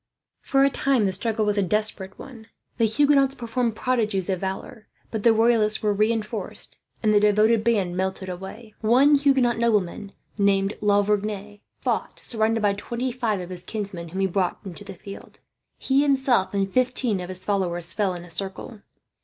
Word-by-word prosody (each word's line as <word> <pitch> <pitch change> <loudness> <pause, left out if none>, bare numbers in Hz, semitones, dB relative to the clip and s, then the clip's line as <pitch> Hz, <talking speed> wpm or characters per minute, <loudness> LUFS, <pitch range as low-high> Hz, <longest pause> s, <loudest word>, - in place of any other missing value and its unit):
For 270 -1 +2
a 275 - +4
time 265 -5 +1
the 190 - 0
struggle 220 +1 -1
was 205 0 +1
a - - +3
desperate 195 0 -1
one. 230 -5 -11 0.3
The 230 - +4
Huguenots 275 +2 +3
performed 235 -1 -2
prodigies 215 -6 0
of 185 - -1
valour; 190 +3 -6 0.2
but 220 - -3
the 230 - +5
Royalists 220 -1 +3
were 210 -1 +2
reinforced, 215 0 -2 0.2
and 215 -1 +3
the 205 - +6
devoted 210 +2 +3
band 200 -6 +1
melted 190 0 -2
away. 190 +5 -8
One 255 +7 +5
Huguenot 270 -5 +3
nobleman, 205 -4 0 0.3
named 200 0 +2
La 205 -1 +3
Vergne, 205 0 -2 0.2
fought - - -2
surrounded 225 -1 0
by 205 -1 +2
twenty 235 +5 -3
five 235 -5 -1
of 180 0 -8
his 180 -1 -7
kinsmen 195 -5 -5
whom 190 +4 -3
he - - +3
brought 185 -1 0
into 190 +1 -5
the 195 -1 -9
field. 200 +2 -11 0.4
He 270 +1 +2
himself, 265 -8 +2
and 195 -1 -1
fifteen 250 -4 +1
of 180 0 -6
his 185 0 -6
followers, 175 -4 -1
fell 195 -4 0
in 175 0 -8
a - - -14
circle. 195 +6 -5
210 Hz, 180 wpm, -24 LUFS, 195-235 Hz, 0.4 s, the